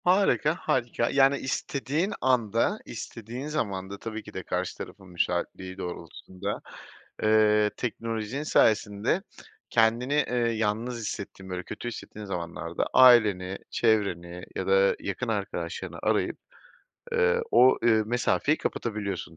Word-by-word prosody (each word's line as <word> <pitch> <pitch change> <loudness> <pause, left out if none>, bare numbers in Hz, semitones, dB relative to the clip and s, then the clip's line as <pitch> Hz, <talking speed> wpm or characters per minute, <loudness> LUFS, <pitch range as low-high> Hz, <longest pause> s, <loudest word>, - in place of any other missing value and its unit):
Harika, 180 -4 +3
harika, 120 -2 0
yani 135 0 +4
istediğin 145 +8 -2
anda, 125 - +2
istediğin 120 +3 -7
zamanda, 100 -9 -3
tabii 110 -1 -6
ki - - -12
de - - -5
karşı - - -3
tarafın 95 -2 -9
müsaitliği 90 +1 -2
doğrultusunda, 90 +2 -6 0.6
eee, 105 -1 +4
teknolojinin 115 +2 -3
sayesinde 110 - +2 0.5
kendini, 115 +4 +2
eee, 145 -4 +1
yalnız 115 0 0
hissettiğin 100 -3 -6
böyle 90 0 -3
kötü 120 - -7
hissettiğin 110 -2 -7
zamanlarda 85 -3 -3
aileni, 105 -7 +6
çevreni 90 -6 0
ya - - -3
da 485 0 +4
yakın - - -4
arkadaşlarını - - -3
arayıp, - - +1 0.8
eee, 475 0 +3
o, 130 +1 +6
eee, 110 -2 +4
mesafeyi 125 +5 +1
kapatabiliyorsun 100 -7 -3
110 Hz, 115 wpm, -27 LUFS, 100-130 Hz, 0.8 s, aileni